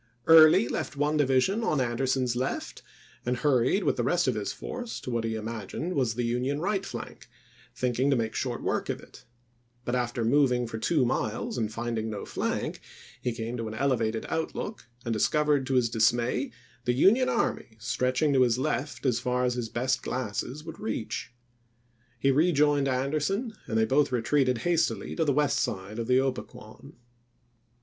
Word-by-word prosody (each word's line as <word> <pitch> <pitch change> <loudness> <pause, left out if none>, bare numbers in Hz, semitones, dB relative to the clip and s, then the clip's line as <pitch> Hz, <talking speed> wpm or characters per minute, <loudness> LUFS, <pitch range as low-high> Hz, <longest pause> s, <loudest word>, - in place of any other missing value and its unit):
Early 155 -6 +8
left 140 - -4
one 145 +2 +1
division 145 - +2
on 155 -9 +1
Anderson's 125 0 0
left, 130 +2 -3 0.4
and 125 +1 -1
hurried 135 - +2
with 150 - +1
the 120 - 0
rest 175 +4 +1
of 130 - +3
his 105 -2 -3
force 245 -2 -6
to 125 - -5
what 115 -1 -1
he 115 0 -2
im 110 -1 -5
agined 115 - -4
was 125 -7 0
the 120 0 -1
Union 125 +4 -1
right 195 +3 0
flank, - - -8 0.5
thinking 125 +2 +1
to 140 - +4
make 115 -2 -1
short - - -3
work - - -1
of - - -2
it; - - -16 0.6
but 120 - -2
after 120 -2 -1
moving 125 -1 +3
for 115 -1 -5
two 145 +1 +2
miles 115 -3 -2
and 110 -3 -1
finding 115 -1 -3
no 105 -2 -5
flank, - - -3 0.4
he 125 - -1
came 115 +1 -4
to 115 -1 -3
an 110 - -6
elevated 115 -3 0
outlook 160 - -4 0.2
and 115 - 0
discovered 145 +4 +2
to 135 - 0
his 125 -2 +4
dismay 120 +3 +1 0.4
the 125 - +2
Union 225 - +4
army 110 - -1
stretching 130 +4 +1
to 130 - +4
his 120 -2 +3
left 150 +1 -2
as 125 -3 +2
far 125 +1 0
as 125 - +1
his 120 -2 -3
best 130 +1 0
glasses 125 +4 -4
would 165 0 -9
reach. 110 +2 -4 0.9
He 135 +3 +2
rejoined 145 -2 +3
Anderson 150 - -1
and 110 - -1
they 110 - +4
both 140 +4 +2
retreated 125 +1 +2
hastily 170 -2 0
to 165 - +1
the 145 - +3
west 145 +1 +2
side 100 +2 -3
of 115 - -3
the 125 0 +4
Gpequon. 130 0 -4
125 Hz, 180 wpm, -28 LUFS, 115-145 Hz, 0.9 s, Early